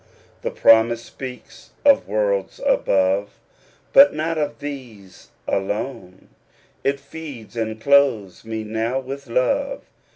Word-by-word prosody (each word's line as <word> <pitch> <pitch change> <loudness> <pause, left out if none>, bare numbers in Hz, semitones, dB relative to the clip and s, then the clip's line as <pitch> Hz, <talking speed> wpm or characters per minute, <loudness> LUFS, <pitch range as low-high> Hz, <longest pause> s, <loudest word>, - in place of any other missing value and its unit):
The - - -2
promise 115 +1 +4
speaks 130 -2 -10 0.2
of 280 -1 +5
worlds 100 -2 -1
above. 95 +1 +1 0.6
But 280 - +8
not 160 +2 -1
of 150 -2 -2
these 125 -10 -9 0.2
alone; 95 -1 -4 0.5
It 140 0 0
feeds 140 -6 -10
and 110 -1 -3
clothes 125 -8 +2
me 110 -1 -5
now 110 +4 -2
with 135 +1 -7
love. 125 +2 0
115 Hz, 110 wpm, -22 LUFS, 105-140 Hz, 0.6 s, But